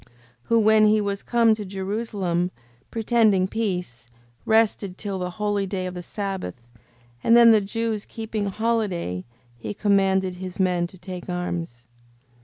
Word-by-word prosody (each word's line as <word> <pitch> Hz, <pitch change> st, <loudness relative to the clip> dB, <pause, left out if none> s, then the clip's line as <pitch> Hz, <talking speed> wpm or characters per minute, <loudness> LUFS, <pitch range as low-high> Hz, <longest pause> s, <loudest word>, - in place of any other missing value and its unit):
5:25. -, -, -25 dB, 0.4 s
Who, 230 Hz, -, +3 dB
when 215 Hz, 0 st, +5 dB
he 215 Hz, 0 st, +4 dB
was 200 Hz, -1 st, -2 dB
come 230 Hz, -2 st, +3 dB
to 215 Hz, -1 st, -4 dB
Jerusalem, 190 Hz, -2 st, -2 dB, 0.4 s
pretending 220 Hz, -4 st, +2 dB
peace, 180 Hz, -, -3 dB, 0.4 s
rested 220 Hz, -4 st, +2 dB
till 200 Hz, -2 st, -4 dB
the 180 Hz, 0 st, -2 dB
holy 205 Hz, -2 st, 0 dB
day 185 Hz, -1 st, -3 dB
of 180 Hz, -, -4 dB
the 180 Hz, -, -6 dB
sabbath: 185 Hz, -, -5 dB, 0.6 s
and 230 Hz, +1 st, +6 dB
then 235 Hz, -1 st, +8 dB
the 215 Hz, -2 st, +5 dB
Jews 220 Hz, +1 st, -2 dB
keeping 220 Hz, -2 st, -4 dB
holiday, 195 Hz, -, -1 dB, 0.3 s
he 205 Hz, -, -5 dB
commanded 190 Hz, -3 st, +2 dB
his 185 Hz, 0 st, -7 dB
men 180 Hz, -2 st, +1 dB
to 185 Hz, -, -15 dB
take 180 Hz, 0 st, -8 dB
arms. 170 Hz, -9 st, -4 dB
195 Hz, 150 wpm, -24 LUFS, 180-220 Hz, 0.6 s, then